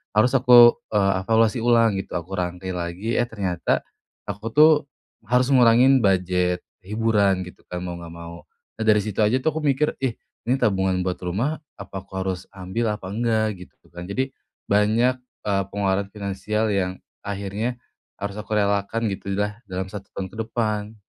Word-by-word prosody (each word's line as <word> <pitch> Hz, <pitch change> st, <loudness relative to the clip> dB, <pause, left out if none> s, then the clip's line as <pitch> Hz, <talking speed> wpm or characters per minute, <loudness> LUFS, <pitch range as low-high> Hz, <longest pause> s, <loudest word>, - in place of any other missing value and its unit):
harus 110 Hz, +4 st, +4 dB
aku, 120 Hz, -2 st, +8 dB, 0.2 s
eee, 100 Hz, -2 st, +3 dB
evaluasi 115 Hz, +1 st, +3 dB
ulang 115 Hz, -4 st, +4 dB
gitu, -, -, -13 dB
aku 90 Hz, +3 st, -7 dB
rangkai 90 Hz, +1 st, -3 dB
lagi, 90 Hz, +6 st, -3 dB
eh 120 Hz, -, +3 dB
ternyata 95 Hz, -7 st, -1 dB, 0.5 s
aku 100 Hz, +2 st, -6 dB
tuh 155 Hz, +1 st, +8 dB, 0.5 s
harus 125 Hz, +3 st, +2 dB
ngurangin 130 Hz, +1 st, +6 dB
budget 90 Hz, -1 st, +1 dB, 0.2 s
hiburan 105 Hz, -3 st, +2 dB
gitu 90 Hz, 0 st, -11 dB
kan, 90 Hz, 0 st, -6 dB
mau 90 Hz, -1 st, -5 dB
nggak 85 Hz, -1 st, -9 dB
mau. 85 Hz, 0 st, -10 dB, 0.3 s
Nah 110 Hz, -, -2 dB
dari 105 Hz, -1 st, +5 dB
situ 105 Hz, -1 st, -6 dB
aja 125 Hz, +5 st, +2 dB
tuh 160 Hz, -, +2 dB
aku 160 Hz, -, -2 dB
mikir, 145 Hz, +2 st, +1 dB
"Ih 130 Hz, -4 st, 0 dB, 0.3 s
ini 125 Hz, -, +2 dB
tabungan 95 Hz, -2 st, +1 dB
buat 90 Hz, 0 st, -2 dB
rumah, 115 Hz, -, -1 dB, 0.2 s
apa 95 Hz, 0 st, -8 dB
aku 95 Hz, -, -21 dB
harus 95 Hz, 0 st, -3 dB
ambil, 105 Hz, +4 st, -2 dB
apa 95 Hz, -3 st, -7 dB
enggak?" 110 Hz, -2 st, 0 dB
Gitu -, -, -31 dB
kan. 90 Hz, 0 st, -8 dB
Jadi 130 Hz, +8 st, -2 dB, 0.4 s
banyak, 110 Hz, +5 st, +3 dB, 0.3 s
eee, 100 Hz, -1 st, +1 dB
pengeluaran 100 Hz, -1 st, 0 dB
finansial 105 Hz, +2 st, -2 dB
yang 95 Hz, -2 st, -1 dB, 0.2 s
akhirnya 100 Hz, +5 st, -3 dB, 0.4 s
harus 100 Hz, +1 st, -4 dB
aku 105 Hz, 0 st, -5 dB
relakan 100 Hz, +2 st, +1 dB
gitulah 100 Hz, +2 st, -3 dB
dalam 95 Hz, 0 st, -4 dB
1 100 Hz, -1 st, -8 dB
tahun 95 Hz, -1 st, -5 dB
ke 110 Hz, -, -12 dB
depan. 110 Hz, -2 st, -2 dB
100 Hz, 165 wpm, -23 LUFS, 95-115 Hz, 0.5 s, aku